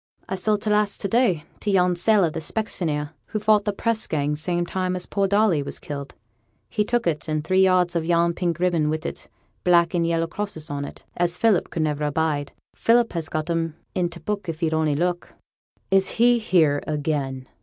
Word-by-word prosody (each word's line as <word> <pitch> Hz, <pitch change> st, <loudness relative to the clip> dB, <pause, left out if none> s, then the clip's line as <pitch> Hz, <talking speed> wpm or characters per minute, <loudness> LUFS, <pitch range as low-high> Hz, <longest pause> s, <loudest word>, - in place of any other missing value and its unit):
'I -, -, -2 dB
sold 205 Hz, +3 st, 0 dB
t' 215 Hz, -, -1 dB
last 210 Hz, -1 st, +1 dB
to -, -, -1 dB
day, 195 Hz, -7 st, +2 dB, 0.2 s
to 210 Hz, -, -3 dB
yon 180 Hz, -2 st, +3 dB
sailor, 185 Hz, -1 st, +4 dB
the 165 Hz, -, -4 dB
specksioneer, 160 Hz, -5 st, -2 dB, 0.2 s
who 215 Hz, -, -3 dB
fought 210 Hz, -1 st, +3 dB
the 205 Hz, -, +1 dB
press 220 Hz, +2 st, -1 dB
gang 150 Hz, -1 st, 0 dB
same 175 Hz, +3 st, -1 dB
time 185 Hz, +1 st, -2 dB
as 180 Hz, -, -4 dB
poor 200 Hz, -1 st, 0 dB
Darley 200 Hz, -5 st, +3 dB
were 140 Hz, -, -5 dB
killed. 140 Hz, -1 st, -7 dB, 0.5 s
He 210 Hz, -, +1 dB
took 240 Hz, +2 st, 0 dB
it, 160 Hz, -2 st, -1 dB
and 155 Hz, -1 st, -1 dB
three 185 Hz, +4 st, +2 dB
yards 185 Hz, -2 st, +3 dB
of 165 Hz, -, +1 dB
yon 170 Hz, 0 st, +2 dB
pink 170 Hz, -2 st, -1 dB
ribbon 170 Hz, -4 st, +1 dB
wi' 155 Hz, -, 0 dB
t' 155 Hz, -, -7 dB, 0.3 s
black 170 Hz, -1 st, +4 dB
and 170 Hz, -1 st, +1 dB
yellow 165 Hz, 0 st, +1 dB
crosses 165 Hz, -3 st, -5 dB
on 140 Hz, 0 st, -3 dB
it, -, -, -11 dB
as 175 Hz, 0 st, 0 dB
Philip 215 Hz, -4 st, +2 dB
could 160 Hz, -, -1 dB
never 150 Hz, -1 st, -1 dB
abide. 150 Hz, -1 st, -1 dB, 0.2 s
Philip 235 Hz, 0 st, +2 dB
has 165 Hz, -3 st, -2 dB
got 155 Hz, -1 st, -2 dB
'em 165 Hz, -1 st, -1 dB, 0.2 s
i' 180 Hz, -1 st, +1 dB
t' 170 Hz, 0 st, -10 dB
book, 205 Hz, -2 st, -4 dB
if 160 Hz, +1 st, -5 dB
he'll 160 Hz, -1 st, +1 dB
only 155 Hz, -2 st, +1 dB
look.' 175 Hz, +3 st, -2 dB, 0.6 s
'Is 195 Hz, 0 st, +4 dB
he 240 Hz, +1 st, +4 dB
here 165 Hz, -10 st, +3 dB
again?' 145 Hz, -4 st, -2 dB
175 Hz, 210 wpm, -23 LUFS, 155-200 Hz, 0.6 s, sailor